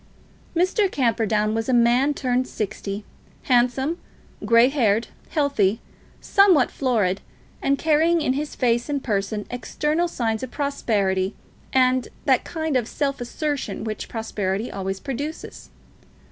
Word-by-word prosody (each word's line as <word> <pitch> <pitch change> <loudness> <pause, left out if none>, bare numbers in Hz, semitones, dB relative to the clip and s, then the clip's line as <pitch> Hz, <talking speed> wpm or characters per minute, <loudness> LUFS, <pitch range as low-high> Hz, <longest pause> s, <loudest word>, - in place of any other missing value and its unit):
Mr. 370 +3 +2
Camperdown 220 -4 +1
was 225 +2 -2
a - - +2
man 245 +4 +4
turned 255 -1 0
sixty, 205 0 -4 0.4
handsome, 260 +6 +2 0.4
grey 230 +3 +6
haired, 230 -6 +1 0.2
healthy, 245 - +1 0.4
somewhat 375 -10 +4
florid, 215 -8 0 0.4
and 275 0 +2
carrying 320 +3 +3
in 260 -5 +1
his 295 +2 -4
face 240 +1 +1
and 285 -2 -1
person 205 -1 -1
external 300 +7 -1
signs 225 -8 -2
of 260 - -5
prosperity 205 -9 0 0.4
and 255 -1 +3 0.2
that - - +3
kind 320 -3 -3
of 245 -3 +1
self 275 -1 -2
assertion 285 0 -3
which 215 -1 -5
prosperity 215 -1 -2
always 195 0 -4
produces. 290 - -6
245 Hz, 125 wpm, -23 LUFS, 215-285 Hz, 0.4 s, grey